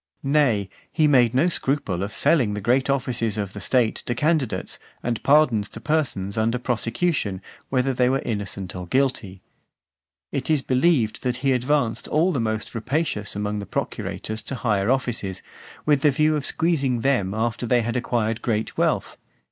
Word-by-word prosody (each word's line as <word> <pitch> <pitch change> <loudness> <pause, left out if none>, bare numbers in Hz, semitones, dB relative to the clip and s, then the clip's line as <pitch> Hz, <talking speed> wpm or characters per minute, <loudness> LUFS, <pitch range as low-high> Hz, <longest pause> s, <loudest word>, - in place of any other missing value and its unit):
Nay, 135 -8 +2 0.2
he 155 -2 +3
made 125 -4 +4
no 145 +7 +4
scruple 135 - -1
of 100 +2 -3
selling 115 -5 +3
the - - -3
great 125 +6 +1
offices 125 -5 0
of 100 -2 -3
the 105 - -7
state 115 +2 +1
to 120 - 0
candidates, 150 -2 0 0.2
and 115 -2 -2
pardons 125 -8 +3
to 115 - -8
persons 115 -7 -1
under 115 +2 +1
prosecution, 120 - -1 0.3
whether 130 0 +1
they 125 0 +2
were 135 +1 0
innocent 100 -4 -3
or 90 -1 -6
guilty. 115 -6 -1 0.9
It 135 +1 -2
is 150 -4 +2
believed, 130 -4 +2
that 125 -1 -1
he 135 - +4
advanced 130 -1 0
all 165 +5 +2
the 140 - -1
most 110 -1 -2
rapacious 115 -3 -2
amongst 105 0 -2
the 100 - -7
procurators 110 0 -4
to 135 - -4
higher 105 -4 0
offices, 115 -8 -1 0.4
with 145 -2 +3
the 150 - +5
view 155 +3 +2
of 145 -3 -1
squeezing 140 -8 +1
them 110 -7 +1
after 115 +1 -1
they 120 0 +3
had 120 +2 -2
acquired 115 -2 -1
great 110 -2 -1
wealth. - - 0
120 Hz, 170 wpm, -23 LUFS, 105-140 Hz, 0.9 s, the